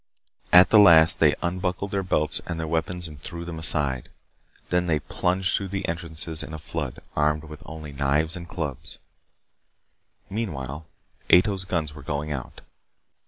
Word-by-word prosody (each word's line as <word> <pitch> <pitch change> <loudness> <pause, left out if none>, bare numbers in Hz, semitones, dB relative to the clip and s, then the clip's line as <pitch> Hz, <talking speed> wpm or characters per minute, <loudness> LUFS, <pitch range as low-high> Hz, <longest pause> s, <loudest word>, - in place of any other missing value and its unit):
At 90 +1 +8
the 110 - +7
last 80 -5 +7
they - - +5
unbuckled 90 +2 -2
their 100 - 0
belts 75 -5 0
and 85 -2 -3
their 80 - -2
weapons 85 +2 -2
and 75 -3 -12
threw 85 -1 -7
them 85 -2 -6
aside. 70 -5 0 0.6
Then 90 0 +1
they 80 -3 +2
plunged 90 +4 0
through 100 - -2
the 95 0 -3
entrances 80 -1 -3
in 80 - -7
a - - -5
flood, 75 -4 -5
armed 75 +1 +1
with 75 +1 -11
only 80 -2 -8
knives 75 +4 +1
and 85 -1 -9
clubs. 80 -1 -5 1.3
Meanwhile, 80 - -5 0.4
Ato's 95 +1 +4
guns 80 -5 -2
were 75 - -11
going 70 +2 -3
out. 65 -4 -6
80 Hz, 160 wpm, -25 LUFS, 75-90 Hz, 1.3 s, At